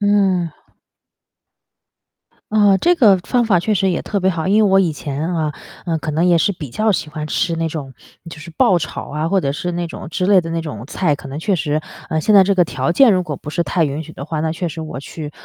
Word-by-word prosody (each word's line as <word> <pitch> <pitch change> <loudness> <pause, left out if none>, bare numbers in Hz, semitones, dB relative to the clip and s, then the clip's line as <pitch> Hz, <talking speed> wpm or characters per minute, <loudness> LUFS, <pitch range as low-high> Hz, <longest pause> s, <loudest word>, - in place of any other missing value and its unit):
嗯。 195 -4 +2 2.0
啊， 205 -3 +4
这 350 +1 +3
个 210 - +5
方 240 +7 0
法 190 -6 +3
确 215 +4 0
实 195 -1 +1
也 170 - -1
特 200 -2 -2
别 190 - +2
好。 165 0 -3
因 215 +2 +4
为 195 - +2
我 195 - +6
以 175 -4 +1
前 150 +3 -4
啊， 155 -2 -1 0.3
嗯， 165 -2 -1
可 155 - -4
能 160 +3 +1
也 175 -1 +4
是 165 - +2
比 155 -9 -7
较 215 - +1
喜 155 -4 -3
欢 150 0 -5
吃 170 +2 0
那 165 0 -1
种 145 -4 -6 0.4
就 165 - -9
是 165 +2 -10
爆 180 -2 +4
炒 155 - -6
啊， 155 +2 -2
或 195 - +2
者 140 -6 0
是 175 +5 -3
那 175 0 -2
种 170 - -8
之 180 +3 -2
类 195 -1 +5
的 165 - -7
那 165 0 -2
种 120 -8 -7
菜， 155 +1 0
可 140 - -9
能 140 - -6
确 195 +5 0
实， 155 -2 -1 0.3
呃， 160 - -1
现 215 - +3
在 195 - +9
这 200 +1 +2
个 180 - +4
条 135 -4 -2
件 235 +4 +5
如 185 - +2
果 150 -5 -5
不 150 - -8
是 170 +3 0
太 170 -1 0
允 145 +2 -3
许 160 +1 -12
的 140 - -7
话， 155 0 -3
那 160 - -1
确 165 +3 -3
实 165 0 -5
我 155 -4 -6
去 150 +2 -7
170 Hz, 275 characters per minute, -18 LUFS, 155-190 Hz, 2.0 s, 在